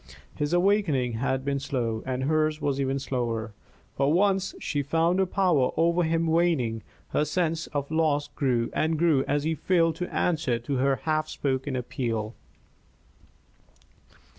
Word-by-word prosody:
His 145 0 -2
awakening 175 - +2
had 135 -1 -1
been 140 0 0
slow, 120 -5 -2
and 130 0 -2
hers 155 +1 +1
was 140 -2 -1
even 135 0 0
slower; 120 -5 -3 0.4
but 140 - +1
once 195 +3 +2
she 145 - -2
found 165 +6 +1
her 190 - +2
power 175 -9 +2
over 170 +1 +3
him 165 0 +1
waning, 160 -9 +1 0.3
her - - +1
sense 165 +1 -1
of 145 0 -4
loss 155 -2 +1
grew 120 -4 -1
and 160 0 0
grew 155 -5 +3
as 145 0 0
he 160 +1 0
failed 165 -1 +1
to 180 - -4
answer 155 -8 0
to 125 +4 -3
her 135 +1 +2
half 155 -1 0
spoken 135 -1 -2
appeal. 115 -3 -3
145 Hz, 150 wpm, -26 LUFS, 130-165 Hz, 0.4 s, over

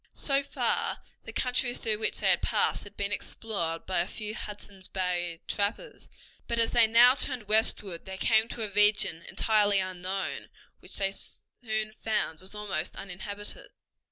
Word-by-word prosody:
So 275 -1 +1
far 280 - -1 0.3
the - - -7
country 250 -1 0
through 215 -2 0
which 220 - -1
they - - +3
had - - +2
passed - - +2
had 205 0 -13
been 200 0 -2
explored 175 -6 -3
by 185 - 0
a 175 - 0
few 215 0 -4
Hudson's 205 -3 -7
Bay 175 -3 -2
trappers, 210 - -3 0.4
but 235 - -1
as 230 0 +4
they 235 -2 +5
now 240 +3 +8
turned 255 -5 0
westward 210 -4 +1
they 190 0 -7
came 220 +2 +4
into 230 0 -5
a 210 - -4
region 205 -5 +4
entirely 210 -2 +3
unknown, 185 0 -3 0.3
which - - -7
they 195 -1 +1
soon 215 +1 -6
found 210 -7 -1
was 190 +3 -10
almost 195 -6 -3
uninhabited. 200 +2 -7
205 Hz, 160 wpm, -29 LUFS, 190-220 Hz, 0.4 s, now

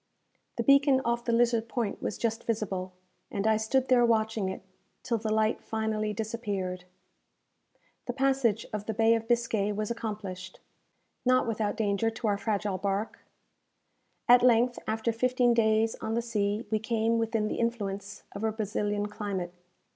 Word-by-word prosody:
The 235 - -1
beacon 275 +1 +5
off 235 0 0
the 235 - 0
Lizard 230 -1 +2
Point 230 -5 -2
was 210 - -3
just 225 -1 -2
visible, 190 -5 -2 0.4
and 200 0 -3
I 220 0 +4
stood 255 +4 +1
there 250 -2 +5
watching 220 -3 +1
it, 190 - -6 0.4
till 230 -2 0
the 215 0 -2
light 220 0 +1
finally 220 -1 -2
disappeared. 205 -4 -3 1.2
The 245 - -1
passage 265 -5 +1
of 210 -1 -4
the 220 - -2
Bay 225 +1 +4
of 225 0 -1
Biscay 230 -4 +1
was 215 +2 -2
accomplished, 205 -5 -6 0.6
not 255 0 +3
without 220 -2 -1
danger 210 +1 +1
to 225 +1 -7
our 205 -1 +2
fragile 205 -2 -1
bark. 200 +3 -2 1.1
At 245 0 +8
length, 245 0 +4
after 220 +1 0
fifteen 250 +1 +2
days 220 -1 +3
on 220 0 -2
the 235 - 0
sea, 210 -1 -1
we 215 - +2
came 225 +1 +1
within 225 -1 0
the - - -3
influence 205 -4 -3
of 200 - -7
a 220 - +1
Brazilian 210 -1 -2
climate. 205 -4 -4
220 Hz, 160 wpm, -29 LUFS, 205-235 Hz, 1.2 s, At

